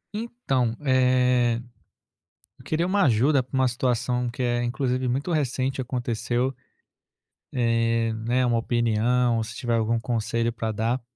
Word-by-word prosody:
Então, 135 - -1
eh, 125 -2 +3 1.0
eu - - -16
queria 160 +2 0
uma 200 +2 +2
ajuda 135 +3 +3
pra 125 - -16
uma 130 - +3
situação 125 0 0
que 120 +2 -4
é, 120 0 +1
inclusive, 125 +1 -1
muito 135 +8 -1
recente, 135 -3 -1
aconteceu, 125 0 -1 1.0
eh, 115 -2 +1
né, 125 +2 +2
uma 120 -1 +2
opinião 120 +1 +1
ou 115 - 0
se 110 - -8
tiver 120 -2 -1
algum 115 +1 +1
conselho 115 0 -1
para 110 -1 -3
dar. 115 +4 -1
125 Hz, 140 wpm, -25 LUFS, 115-130 Hz, 1.0 s, eh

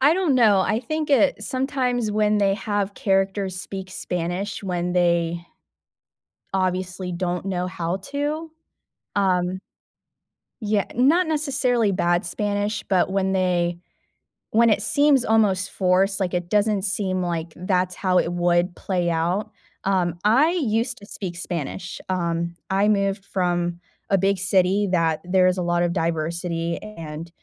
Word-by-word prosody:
I 290 +5 +5
don't 355 -8 +1
know, 215 -6 +5
I 215 +4 +1
think 310 +3 -3
it 280 +1 +3
sometimes 255 -4 -1
when 210 0 +2
they 195 -1 +3
have 205 0 -2
characters 195 -1 0
speak 190 0 -7
Spanish 180 +4 -3
when 180 -2 -2
they 170 -1 +1 1.1
obviously 185 -1 -1
don't 180 +1 -2
know 180 -1 -1
how 180 -1 -3
to, 290 - -3 0.7
um 185 -1 +1 1.0
Yeah, 210 -1 0
not 310 +9 +4
necessarily 260 -8 +1
bad 175 -1 +1
Spanish, 205 +3 -2
but 190 -1 +2
when 190 -1 +1
they 175 -2 +1 0.7
when 230 +1 +5
it 210 -1 +2
seems 285 +2 +3
almost 200 -4 +2
forced, 190 +1 +2
like, 180 -1 -1
it 175 0 -2
doesn't 210 -2 +2
seem 190 -2 0
like 170 -2 -3
that's 185 0 0
how 185 -1 +1
it 170 - -1
would 175 0 +1
play 180 -3 -1
out. 175 +6 0 0.3
Um, 180 -3 0
I 265 +10 +4
used 245 -7 0
to 205 - -12
speak 185 -4 -6
Spanish. 180 +1 -5
Um, 170 -2 -1
I 195 +2 +2
moved 200 -1 +1
from 175 -2 -1 0.3
a 195 - +4
big 195 +1 +2
city 190 +2 +2
that 165 -2 +2
there 185 0 +3
is 185 +1 +1
a - - -1
lot 175 0 +1
of 175 - +1
diversity 165 +1 -2
and 165 -5 -8
190 Hz, 145 wpm, -23 LUFS, 175-210 Hz, 1.1 s, I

